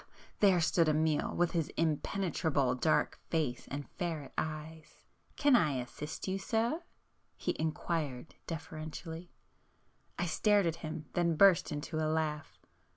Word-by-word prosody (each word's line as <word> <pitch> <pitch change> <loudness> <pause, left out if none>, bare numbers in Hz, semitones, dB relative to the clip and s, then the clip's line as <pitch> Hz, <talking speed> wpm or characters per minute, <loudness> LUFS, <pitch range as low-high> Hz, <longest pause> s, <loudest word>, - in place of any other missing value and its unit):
—there 195 -4 +5
stood 165 0 +3
Amiel, 155 0 +1
with 175 -1 +2
his 165 -3 0
impenetrable 160 -4 +1
dark 155 +5 +1
face 150 -7 -1
and 140 0 -5
ferret 165 -6 -4
eyes! 155 0 -5 0.3
"Can 285 -3 +5
I 155 -11 +4
assist 130 +7 -5
you 190 +1 -1
sir?" 230 - 0 0.6
he - - -1
inquired 155 -3 -2
deferentially. 160 +1 -6 0.9
I 175 - 0
stared 200 +4 +3
at 165 -1 0
him,—then 165 +2 -1
burst 190 0 +6
into 150 +2 -3
a 155 - +1
laugh. 155 -2 -2
160 Hz, 125 wpm, -33 LUFS, 150-175 Hz, 0.9 s, burst